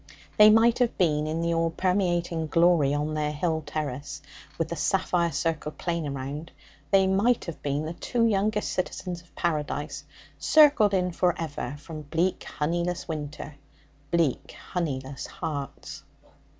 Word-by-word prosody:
They 210 Hz, 0 st, +9 dB
might 225 Hz, +2 st, +5 dB
have 245 Hz, -2 st, +1 dB
been, 155 Hz, -4 st, +2 dB
in 160 Hz, +2 st, -2 dB
the 170 Hz, 0 st, +1 dB
all 165 Hz, 0 st, +1 dB
permeating 175 Hz, -2 st, 0 dB
glory 165 Hz, -3 st, +4 dB
on 150 Hz, +1 st, -1 dB
their 150 Hz, -1 st, -1 dB
hill 160 Hz, +1 st, -1 dB
terrace, 145 Hz, -2 st, -4 dB, 0.4 s
with 165 Hz, -1 st, -1 dB
the 170 Hz, -, -3 dB
sapphire 175 Hz, 0 st, +1 dB
circled 160 Hz, -2 st, -2 dB
plain 170 Hz, -3 st, -2 dB
around 140 Hz, +3 st, -5 dB, 0.4 s
they 195 Hz, +3 st, +5 dB
might 200 Hz, +6 st, +2 dB
have 170 Hz, -3 st, -7 dB
been 145 Hz, +2 st, -1 dB
the 160 Hz, -, -4 dB
two 230 Hz, +6 st, 0 dB
youngest 210 Hz, 0 st, +1 dB
citizens 180 Hz, -1 st, -3 dB
of 170 Hz, -, -26 dB
Paradise, 150 Hz, -2 st, -2 dB, 0.4 s
circled 285 Hz, -10 st, +5 dB
in 180 Hz, -1 st, +1 dB
for 175 Hz, 0 st, +1 dB
ever 145 Hz, -5 st, -4 dB
from 155 Hz, +1 st, -8 dB
bleak 165 Hz, +5 st, -1 dB
honeyless 170 Hz, +3 st, -2 dB
winter, 150 Hz, -2 st, -6 dB, 0.5 s
bleak 165 Hz, -5 st, 0 dB, 0.2 s
honeyless 135 Hz, -6 st, -3 dB
hearts. 145 Hz, -5 st, -6 dB
165 Hz, 145 wpm, -27 LUFS, 150-180 Hz, 0.5 s, They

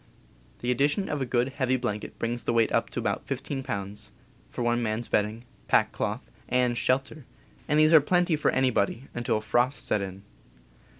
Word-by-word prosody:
The 120 Hz, -, 0 dB
addition 145 Hz, -, +1 dB
of 150 Hz, -2 st, -2 dB
a 130 Hz, -, -1 dB
good, 125 Hz, +3 st, 0 dB
heavy 130 Hz, -2 st, +2 dB
blanket 105 Hz, -4 st, -4 dB
brings 120 Hz, +1 st, -2 dB
the -, -, -1 dB
weight 115 Hz, -1 st, +3 dB
up -, -, +1 dB
to -, -, -4 dB
about -, -, -2 dB
15 135 Hz, -2 st, -3 dB
pounds, 105 Hz, -6 st, -5 dB, 0.4 s
for 120 Hz, -, -4 dB
one 120 Hz, 0 st, +1 dB
man's 110 Hz, +1 st, -2 dB
bedding, 110 Hz, +3 st, -1 dB, 0.2 s
pack -, -, +3 dB
cloth, -, -, -3 dB, 0.2 s
and 125 Hz, -1 st, +2 dB
shelter 135 Hz, +5 st, 0 dB, 0.2 s
— -, -, -29 dB
and 150 Hz, 0 st, +3 dB
these 155 Hz, +1 st, +5 dB
are 160 Hz, -, +9 dB
plenty 175 Hz, +2 st, +2 dB
for 150 Hz, -, +1 dB
anybody 125 Hz, -2 st, +1 dB
until 120 Hz, -3 st, -1 dB
frosts 120 Hz, +5 st, +1 dB
set 105 Hz, -, 0 dB
in. 95 Hz, 0 st, -6 dB
125 Hz, 185 wpm, -27 LUFS, 115-140 Hz, 0.4 s, are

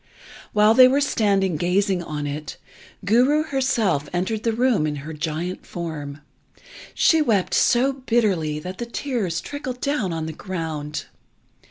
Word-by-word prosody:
While 210 Hz, +1 st, +5 dB
they 255 Hz, +2 st, +8 dB
were 270 Hz, +2 st, +2 dB
standing 200 Hz, -, +1 dB
gazing 185 Hz, +3 st, +1 dB
on 150 Hz, -3 st, -5 dB
it, 150 Hz, +1 st, -5 dB, 0.5 s
Guru 255 Hz, +9 st, +4 dB
herself 250 Hz, -, 0 dB
entered 190 Hz, +5 st, -1 dB
the 230 Hz, -, 0 dB
room 230 Hz, -8 st, +2 dB
in 150 Hz, -, -2 dB
her 160 Hz, -, -6 dB
giant 160 Hz, +4 st, -4 dB
form. 150 Hz, -4 st, -6 dB, 0.7 s
She 320 Hz, -1 st, +4 dB
wept 215 Hz, -10 st, +1 dB
so 260 Hz, +3 st, +3 dB
bitterly 215 Hz, -, 0 dB
that 180 Hz, +5 st, -7 dB
the 240 Hz, -, -4 dB
tears 235 Hz, -, -2 dB
trickled 260 Hz, -3 st, -6 dB
down 275 Hz, -10 st, -1 dB
on 160 Hz, -1 st, -3 dB
the 160 Hz, -, -5 dB
ground. 160 Hz, -5 st, -5 dB
195 Hz, 145 wpm, -23 LUFS, 160-245 Hz, 0.7 s, they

